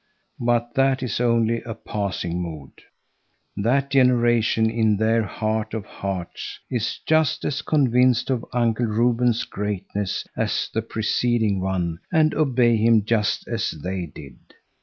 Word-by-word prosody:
But 120 -1 0
that 135 0 +2
is 115 -4 -2
only 115 -1 +2
a 115 -2 -7
passing 90 -4 -3
mood. 80 -5 -7 0.8
That 130 +7 +1
generation 120 -4 +3
in 110 -2 +2
their 110 +2 +2
heart 110 +1 -2
of 110 -2 -4
hearts 95 -4 -5
is 120 -3 -2
just 155 -1 +2
as 140 -1 -1
convinced 125 -5 +2
of 120 -3 -1
Uncle 120 -1 +1
Reuben's 120 +1 +2
greatness 100 -1 -3
as - - -1
the 110 - 0
preceding 110 -1 0
one 90 -3 -2
and 155 -2 +3
obey 125 -6 +3
him 110 -1 +3
just 110 -2 0
as - - -1
they 90 +3 -4
did. 70 -3 -12
115 Hz, 135 wpm, -23 LUFS, 100-125 Hz, 0.8 s, generation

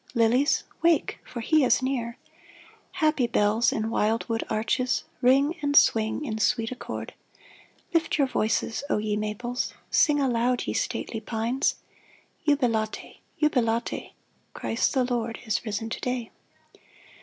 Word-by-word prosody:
Lilies, 240 +5 +3 0.2
wake 335 -2 +2
— - - -36
for 240 - -5
he 310 +5 +3
is 255 - +3
near! 245 -3 -2 0.8
Happy 305 -5 +2
bells 225 +1 +2
in 220 +1 -2
wild 225 +1 +1
wood 230 -1 -1
arches, 245 +3 0 0.2
Ring 275 +5 +4
and 285 -1 0
swing 225 +3 +4
in 220 -4 -3
sweet 225 +1 +1
accord! 255 - -6 0.8
Lift 330 -2 +1
your 280 - +4
voices, 225 -1 -1
O - - +2
ye 210 0 -1
maples. 215 +4 -3 0.2
Sing 295 -2 +4
aloud, 245 -2 +1
ye - - -2
stately 225 - -2
pines, 230 +4 -1 0.7
Jubilate! 235 -7 0 0.2
Jubilate! 235 -6 0 0.4
Christ 230 - 0
the 260 - +3
Lord 235 -2 -2
is 220 - -1
risen 215 +1 -2
to - - -4
day 250 -2 -3
240 Hz, 135 wpm, -26 LUFS, 225-265 Hz, 0.8 s, Ring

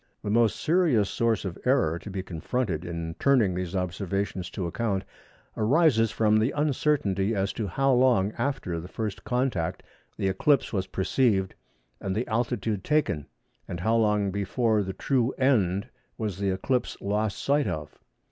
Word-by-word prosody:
The 100 - -2
most 115 -1 +3
serious 155 - +2
source 115 -3 0
of 90 -3 -5
error 125 - +2
to 105 - -9
be 95 -1 -4
confronted 90 +1 -2
in 85 -1 -4
turning 125 -9 +3
these 90 0 -4
observations 95 0 -2
to 90 +1 -4
account 100 +1 -1 0.5
arises 115 -1 +3
from 110 0 +2
the 110 +4 +2
uncertainty 135 -9 +1
as 95 0 0
to 110 - -3
how 135 +8 +2
long 120 -6 +3
after 135 -12 -2
the 85 - -8
first 105 +1 -4
contact 125 -9 -1 0.3
the 95 - 0
eclipse 115 +9 +2
was 95 -2 -1
perceived 95 -1 +1 0.5
and 95 -1 -3
the 115 +4 -1
altitude 115 -3 -1
taken; 140 - 0 0.4
and 85 -1 -5
how 110 +4 +2
long 105 -3 +2
before 105 +3 +1
the 95 -1 -3
true 130 +1 0
end 110 -7 +2 0.3
was 105 -4 -3
the 100 -1 0
eclipse 120 +7 -1
lost 105 0 -1
sight 145 +1 +1
of. 75 -1 -5
105 Hz, 155 wpm, -27 LUFS, 95-125 Hz, 0.5 s, most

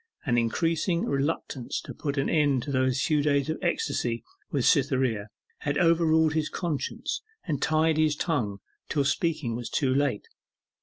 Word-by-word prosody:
An 125 -5 +2
increasing 165 - +1
reluctance 140 -2 -2
to - - -8
put 145 -1 -4
an 135 - +1
end 145 -5 +2
to 145 - -4
those 130 -1 +1
few 150 -2 +2
days 145 0 +1
of 155 - -4
ecstasy 125 -9 -1 0.3
with 135 -4 0
Cytherea 130 - +2 0.3
had 145 0 -1
overruled 160 -2 +4
his 155 -1 0
conscience, 165 -6 -3 0.2
and 150 -5 -2
tied 155 0 +2
his 155 -1 +3
tongue 115 - -1 0.3
till 145 -3 +1
speaking 140 -4 0
was 120 0 -5
too 130 -3 +1
late. 140 -6 0
145 Hz, 155 wpm, -27 LUFS, 130-160 Hz, 0.3 s, overruled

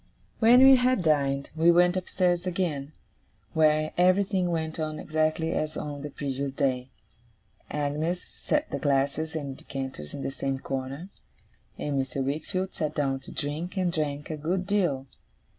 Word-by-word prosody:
When 245 +3 +7
we 270 0 +9
had 250 -5 +2
dined, 140 -3 +1
we 165 +2 +4
went 175 +1 +5
upstairs 180 -1 0
again, 155 -6 -2 0.6
where 155 -1 +3
everything 185 0 +3
went 160 -1 -2
on 155 -1 -2
exactly 155 +1 0
as 155 0 -2
on 145 -1 -5
the 150 - -5
previous 140 -1 -3
day. 130 -3 0 0.8
Agnes 150 +4 -1
set 300 +1 -2
the - - -2
glasses 145 +3 0
and 140 -4 -4
decanters 130 - -6
in 140 - -5
the - - -2
same 135 0 -2
corner, 135 +6 -5 0.7
and 140 -2 0
Mr. 135 0 -3
Wickfield 160 +7 -2
sat 155 -1 -2
down 135 -2 0
to - - -12
drink, 155 +7 -4
and 180 -2 +1
drank 150 -1 -2
a 155 - -3
good 180 +5 -1
deal. 175 -10 +1
155 Hz, 155 wpm, -27 LUFS, 140-175 Hz, 0.8 s, we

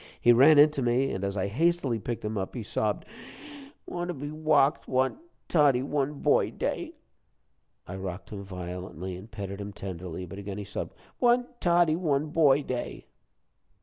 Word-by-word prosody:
He 120 - +6
ran 140 +6 +7
in 150 +1 +8
to 140 - -3
me, 125 +2 +2
and 95 - -4
as 100 +1 -2
I 95 - 0
hastily 140 +1 +1
picked 115 +1 -4
him 105 +1 -2
up, 95 +3 -3
he 120 - -4
sobbed: 105 0 -1 0.8
"Want 175 0 -4
to 180 - -3
be 145 +2 -6
wocked. 155 -2 +2
Want 130 - +1 0.3
'Toddie 140 -6 +4
one 145 +1 -1
boy - - +3
day.'" - - -3 0.9
I 95 - -7
rocked 95 -1 -6
him 100 -2 -6
violently, 90 -1 -6
and 95 +5 -11
petted 100 -2 -6
him 100 0 -6
tenderly, 90 -2 -6
but 95 +3 -9
again 100 0 -6
he 105 - -4
sobbed: 100 - -6 0.2
"Want 245 0 +2
'Toddie 170 -2 +3
one 150 -4 0
boy 145 -3 +4
day.'" 125 -2 -5
125 Hz, 175 wpm, -28 LUFS, 100-150 Hz, 0.9 s, in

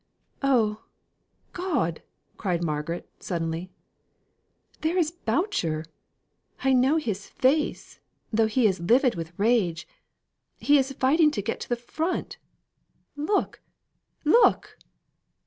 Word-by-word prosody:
"Oh, 225 -6 +1 0.7
God!" 300 - -1 0.3
cried 175 -4 -1
Margaret, 155 +2 -3
suddenly; 165 +1 -3 1.1
"there 325 +3 0
is 325 -3 +2
Boucher. 225 - -1 0.8
I 265 0 +3
know 260 +5 +4
his 210 -10 -3
face, 295 +4 0 0.3
though 220 0 +3
he 235 +2 +1
is 190 -4 +2
livid 240 - +3
with 165 -1 -6
rage, 200 -7 +1 0.7
he 290 0 +4
is 270 0 -1
fighting 300 +5 +4
to 205 -9 -3
get 225 - -3
to - - -7
the 240 - +2
front 315 +9 -3 0.8
look! 305 +8 -1 0.6
look!" 460 +11 +3
240 Hz, 110 wpm, -26 LUFS, 180-300 Hz, 1.1 s, know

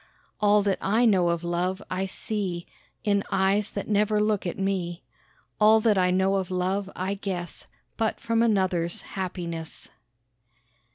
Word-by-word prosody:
All 210 -1 +4
that 195 -1 0
I 220 +5 +2
know 185 -6 +4
of 170 0 -1
love 175 +2 -1
I 190 +1 -1
see 190 -4 -3 0.4
In 200 -2 +2
eyes 195 +2 +2
that 200 - -5
never 210 0 +2
look 210 -3 +1
at 175 - -4
me; 185 -3 -2 0.6
All 215 +1 +6
that 215 -2 +3
I 180 -1 +3
know 190 +2 +2
of 190 -2 -2
love 185 +2 -1
I 190 +2 -2
guess 185 -3 -5 0.3
But 220 -1 0
from 230 0 +1
another's 185 -6 +1
happiness. 170 -4 -5
195 Hz, 150 wpm, -26 LUFS, 180-210 Hz, 0.6 s, All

